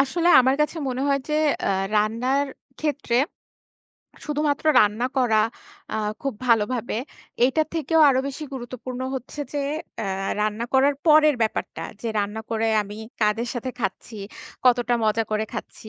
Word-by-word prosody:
আসলে 335 Hz, +6 st, +2 dB
আমার 260 Hz, +1 st, +3 dB
কাছে 300 Hz, +3 st, +1 dB
মনে 255 Hz, +1 st, -2 dB
হয় 275 Hz, 0 st, +2 dB
যে, 300 Hz, -, 0 dB, 0.3 s
আ -, -, +2 dB, 0.3 s
রান্নার 245 Hz, +7 st, +1 dB, 0.3 s
ক্ষেত্রে 290 Hz, -5 st, -1 dB, 1.1 s
শুধুমাত্র 295 Hz, -1 st, -1 dB, 0.2 s
রান্না 215 Hz, +4 st, +2 dB
করা 230 Hz, -4 st, +3 dB, 0.6 s
আ -, -, 0 dB, 0.3 s
খুব 275 Hz, -4 st, -2 dB
ভালোভাবে, 230 Hz, 0 st, +1 dB, 0.5 s
এটা 310 Hz, +5 st, +2 dB
থেকেও 320 Hz, +1 st, +2 dB
আরো 260 Hz, -, +2 dB
বেশি 280 Hz, +3 st, -6 dB
গুরুত্বপূর্ণ 255 Hz, 0 st, -6 dB
হচ্ছে 265 Hz, +3 st, -6 dB
যে 290 Hz, -, -1 dB, 0.4 s
অ্যা 195 Hz, -2 st, -2 dB
রান্না 215 Hz, +2 st, -1 dB
করার 275 Hz, +2 st, +4 dB
পরের 305 Hz, -1 st, +6 dB
ব্যাপারটা 220 Hz, -, -2 dB, 0.2 s
যে 235 Hz, -, -2 dB
রান্না 205 Hz, +2 st, -2 dB
করে 225 Hz, 0 st, +1 dB
আমি 205 Hz, +1 st, -9 dB, 0.2 s
কাদের 220 Hz, +3 st, +1 dB
সাথে 245 Hz, +2 st, -3 dB
খাচ্ছি, 215 Hz, +3 st, -4 dB, 0.5 s
কতটা 245 Hz, 0 st, +4 dB
মজা 220 Hz, +1 st, +2 dB
করে 215 Hz, 0 st, 0 dB
খাচ্ছি। 220 Hz, -, -7 dB
245 Hz, 145 wpm, -24 LUFS, 220-280 Hz, 1.1 s, পরের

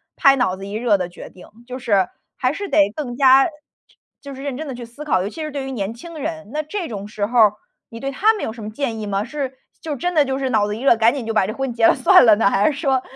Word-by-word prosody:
拍 275 Hz, 0 st, +5 dB
脑 190 Hz, -7 st, +1 dB
子 195 Hz, -, -9 dB
一 200 Hz, -, -7 dB
热 220 Hz, -2 st, +2 dB
的 180 Hz, -1 st, -4 dB
决 175 Hz, -, -11 dB
定。 180 Hz, -, -15 dB, 0.2 s
就 255 Hz, -, -6 dB
是 200 Hz, -7 st, +2 dB, 0.3 s
还 255 Hz, +1 st, 0 dB
是 400 Hz, +3 st, -5 dB
得 200 Hz, 0 st, +4 dB
更 250 Hz, -5 st, -5 dB
加 270 Hz, 0 st, +6 dB
就 -, -, -6 dB, 0.7 s
就 280 Hz, -1 st, -9 dB
是 270 Hz, -, -9 dB
认 280 Hz, -3 st, -3 dB
真 315 Hz, -, -5 dB
地 265 Hz, -, -5 dB
去 240 Hz, -1 st, -8 dB
思 240 Hz, +6 st, -11 dB
考， 185 Hz, -11 st, +2 dB
尤 -, -, -3 dB
其 320 Hz, -, -9 dB
是 305 Hz, -, -5 dB
对 280 Hz, -2 st, -4 dB
于 270 Hz, -, -5 dB
年 205 Hz, -1 st, -3 dB
轻 325 Hz, +7 st, -11 dB
人， 165 Hz, -, -5 dB
那 305 Hz, +1 st, -2 dB
这 350 Hz, +3 st, -4 dB
种 205 Hz, -4 st, -6 dB
时 210 Hz, -1 st, -3 dB
候 240 Hz, +4 st, -3 dB
儿 210 Hz, -2 st, +6 dB, 0.4 s
你 230 Hz, -, -9 dB
对 275 Hz, +2 st, -3 dB
他 435 Hz, +10 st, +3 dB
们 425 Hz, -, -5 dB
有 220 Hz, -, -4 dB
什 225 Hz, -2 st, -10 dB
么 210 Hz, -, -5 dB
建 225 Hz, -1 st, -3 dB
议 210 Hz, -, -4 dB
吗？ 200 Hz, +1 st, -1 dB
是 265 Hz, 0 st, -5 dB, 0.2 s
就 310 Hz, -3 st, -4 dB
真 355 Hz, +6 st, -2 dB
的 300 Hz, -3 st, +4 dB
就 265 Hz, 0 st, -2 dB
是 265 Hz, -1 st, -1 dB
脑 215 Hz, -3 st, +2 dB
子 210 Hz, -, -3 dB
一 235 Hz, -, -8 dB
热， 250 Hz, -4 st, +4 dB
赶 230 Hz, +3 st, +3 dB
紧 260 Hz, -5 st, -5 dB
就 225 Hz, -, -3 dB
把 195 Hz, -3 st, +2 dB
这 215 Hz, -, -4 dB
婚 270 Hz, 0 st, -3 dB
结 230 Hz, -1 st, +4 dB
了 -, -, +4 dB
算 255 Hz, -, +6 dB
了 220 Hz, -3 st, +7 dB
呢？ 205 Hz, -2 st, +3 dB
还 200 Hz, +10 st, +3 dB
是 280 Hz, -, -7 dB
说 270 Hz, -5 st, +1 dB
245 Hz, 330 characters per minute, -20 LUFS, 215-275 Hz, 0.7 s, 了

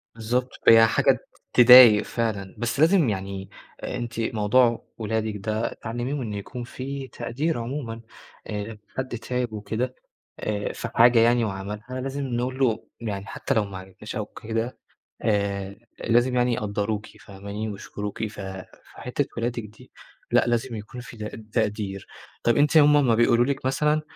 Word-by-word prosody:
بالضبط، 120 Hz, +3 st, -1 dB, 0.2 s
هي 115 Hz, 0 st, +9 dB
حاجة -, -, +3 dB, 0.3 s
تضايق 125 Hz, -3 st, +9 dB
فعلًا، 105 Hz, -5 st, -3 dB
بس 120 Hz, +4 st, -2 dB
لازم 165 Hz, -, +5 dB
يعني 95 Hz, -1 st, -4 dB, 0.3 s
آآ -, -, -4 dB
أنتِ 120 Hz, -1 st, -5 dB
موضوع 115 Hz, +2 st, +2 dB
ولادِك 110 Hz, -1 st, -2 dB
ده 110 Hz, +3 st, -2 dB
تعلِّميهم 120 Hz, +5 st, -4 dB
إن 110 Hz, -3 st, -4 dB
يكون 110 Hz, +4 st, -6 dB
في 135 Hz, +2 st, -6 dB
تقدير 145 Hz, +6 st, -2 dB
عمومًا، 115 Hz, -2 st, -5 dB, 0.5 s
آآ 105 Hz, +1 st, -5 dB, 0.2 s
حد 130 Hz, -2 st, -3 dB
تعِب 125 Hz, -1 st, -3 dB
وكده 110 Hz, +5 st, -3 dB, 0.5 s
آآ 105 Hz, -1 st, -2 dB
في 120 Hz, -, -5 dB
حاجة 120 Hz, 0 st, +6 dB
يعني 120 Hz, 0 st, +4 dB
وعملها، 105 Hz, +2 st, -5 dB
لازم 135 Hz, +1 st, -3 dB
نقول 125 Hz, +1 st, -2 dB
له 115 Hz, -5 st, +1 dB
يعني 100 Hz, -3 st, -4 dB
حتّى 90 Hz, -, -2 dB
لو 110 Hz, -2 st, +2 dB
ما 95 Hz, -2 st, -7 dB
عجبتناش 95 Hz, +5 st, -9 dB
أو 105 Hz, -1 st, -2 dB
كده، 115 Hz, +3 st, -4 dB, 0.4 s
آآ 100 Hz, -2 st, -1 dB, 0.2 s
لازم 120 Hz, +2 st, +2 dB
يعني 125 Hz, -1 st, +2 dB
يقدَّروكِ، 105 Hz, 0 st, -2 dB
فاهماني، 100 Hz, +2 st, -6 dB
ويشكروكِ، 105 Hz, +1 st, -5 dB
ف 105 Hz, -1 st, -9 dB, 0.5 s
فحتّة 125 Hz, +3 st, -2 dB
ولادِك 120 Hz, 0 st, -2 dB
دي، 105 Hz, 0 st, -15 dB, 0.4 s
لأ، -, -, +4 dB
لازم 120 Hz, 0 st, -1 dB
يكون 110 Hz, +4 st, -8 dB
في 120 Hz, -1 st, -11 dB
ت 110 Hz, 0 st, -8 dB
تقدير. 105 Hz, -4 st, -1 dB, 0.4 s
طَب 120 Hz, -1 st, +3 dB
أنتِ 150 Hz, +2 st, +3 dB
هم 150 Hz, -1 st, +7 dB
امّا 130 Hz, -6 st, +4 dB
بيقولوا 120 Hz, +1 st, +4 dB
لِك 135 Hz, -2 st, -2 dB
مثلًا، 150 Hz, +3 st, +2 dB
115 Hz, 150 wpm, -25 LUFS, 105-125 Hz, 0.5 s, هي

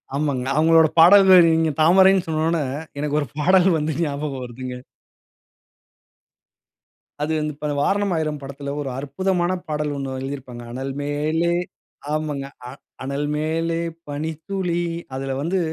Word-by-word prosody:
ஆமாங்க. 140 Hz, -3 st, -1 dB
அவுங்களோட 160 Hz, +1 st, +5 dB
பாடல்கள் 185 Hz, +1 st, +8 dB
நீங்க 160 Hz, -1 st, +2 dB
தாமரைன்னு 190 Hz, +3 st, +5 dB
சொன்ன 155 Hz, -1 st, -1 dB
உடனே 165 Hz, -2 st, +1 dB, 0.4 s
எனக்கு 150 Hz, 0 st, -1 dB
ஒரு 145 Hz, -, -4 dB
பாடல் 185 Hz, +4 st, +4 dB
வந்து 155 Hz, +1 st, -1 dB
ஞாபகம் 140 Hz, -3 st, -3 dB
வருதுங்க. 125 Hz, +1 st, -7 dB, 2.4 s
அது 150 Hz, -, -1 dB
வந்து 150 Hz, 0 st, -2 dB
இப்ப 150 Hz, +1 st, -5 dB, 0.2 s
"வாரணம் 200 Hz, 0 st, +1 dB
ஆயிரம்" 155 Hz, -2 st, -2 dB
படத்தில 140 Hz, +1 st, -6 dB
ஒரு 140 Hz, -, -4 dB
அற்புதமான 175 Hz, +5 st, -1 dB, 0.2 s
பாடல் 150 Hz, -1 st, -2 dB
ஒன்னு 135 Hz, -1 st, -4 dB
எழுதியிருப்பாங்க. 130 Hz, -3 st, -7 dB
"அனல் 135 Hz, +2 st, -4 dB
மேலே" 155 Hz, +4 st, 0 dB, 0.6 s
ஆமங்க 150 Hz, -3 st, -2 dB, 0.2 s
அ -, -, -8 dB, 0.3 s
"அனல் 140 Hz, +2 st, -2 dB
மேலே 165 Hz, +2 st, -1 dB, 0.3 s
பனித்துளி" 165 Hz, +4 st, -3 dB, 0.3 s
அதில 135 Hz, 0 st, -3 dB
வந்து, 180 Hz, +5 st, 0 dB
150 Hz, 125 wpm, -22 LUFS, 140-170 Hz, 2.4 s, பாடல்கள்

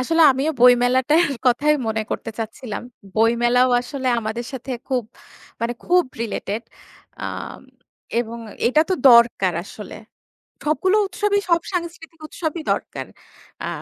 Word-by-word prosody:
আসলে 325 Hz, +5 st, +3 dB
আমিও 275 Hz, +4 st, 0 dB
বইমেলাটার 250 Hz, +6 st, +5 dB, 0.2 s
কথাই 295 Hz, +5 st, +4 dB
মনে 220 Hz, 0 st, -1 dB
করতে 225 Hz, -, -3 dB
চাচ্ছিলাম। 220 Hz, 0 st, -5 dB, 0.3 s
বইমেলাও 240 Hz, +3 st, +3 dB
আসলে 260 Hz, 0 st, -4 dB
আমাদের 225 Hz, +2 st, -4 dB
সাথে 265 Hz, 0 st, -7 dB, 0.2 s
খুব 255 Hz, -2 st, 0 dB, 0.6 s
মানে 235 Hz, +1 st, -1 dB
খুব 360 Hz, 0 st, +4 dB, 0.2 s
রিলেটেড। 220 Hz, 0 st, -4 dB, 0.6 s
আ -, -, -1 dB, 0.9 s
এবং 235 Hz, 0 st, -6 dB, 0.3 s
এইটা 305 Hz, +6 st, +4 dB
তো -, -, +4 dB, 0.2 s
দরকার 235 Hz, -7 st, +5 dB
আসলে। 210 Hz, +1 st, -10 dB, 0.7 s
সবগুলো 370 Hz, +7 st, +2 dB
উৎসবই 405 Hz, +2 st, 0 dB
সব 335 Hz, 0 st, +4 dB
সাংস্কৃতিক 335 Hz, -2 st, -5 dB
উৎসবই 315 Hz, 0 st, -4 dB
দরকার। -, -, -4 dB, 0.6 s
আ -, -, -2 dB
255 Hz, 120 wpm, -21 LUFS, 235-325 Hz, 0.9 s, বইমেলাটার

